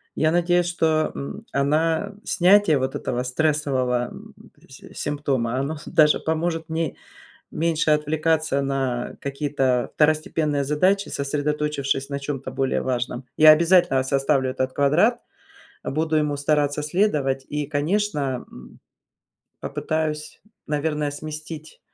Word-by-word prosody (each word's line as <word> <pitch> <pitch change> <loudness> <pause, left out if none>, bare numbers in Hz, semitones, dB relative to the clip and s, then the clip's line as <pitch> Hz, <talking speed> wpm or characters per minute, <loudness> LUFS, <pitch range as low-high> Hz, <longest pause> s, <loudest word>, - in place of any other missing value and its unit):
Я 155 0 +2
надеюсь, 175 0 +2
что, 160 -2 +1
м, 205 +11 -7
она 160 +6 +1
снятие 185 -4 +4
вот 130 +1 -2
этого 125 +1 -2
стрессового 130 -3 0 0.6
си - - -14
симптома, 135 -5 -2
оно 145 +3 -3
с - - -13
даже 150 -1 +4
поможет 160 0 -2
мне 160 -2 -2 0.6
меньше 160 -1 +1
отвлекаться 155 -1 +1
на 135 -3 -2
какие-то 140 -3 -1
второстепенные 155 -1 +1
задачи, 185 +8 +1
сосредоточившись 145 -1 -2
на 140 - -3
чём-то 135 -2 -5
более 135 +1 0
важном. 125 0 -3
Я 155 0 +9
обязательно 170 -3 +4
составлю 135 0 +1
этот 130 0 -2
квадрат, 175 - +3 0.7
буду 155 +2 0
ему 150 -1 +1
стараться 145 0 0
следовать 150 -6 0
и, 150 -1 -3
конечно, 145 -3 -1
м, 60 0 -14 0.8
попытаюсь, 155 -1 -3 0.3
наверное, 150 0 -1
сместить, 155 +1 -8
150 Hz, 115 wpm, -23 LUFS, 135-160 Hz, 0.8 s, Я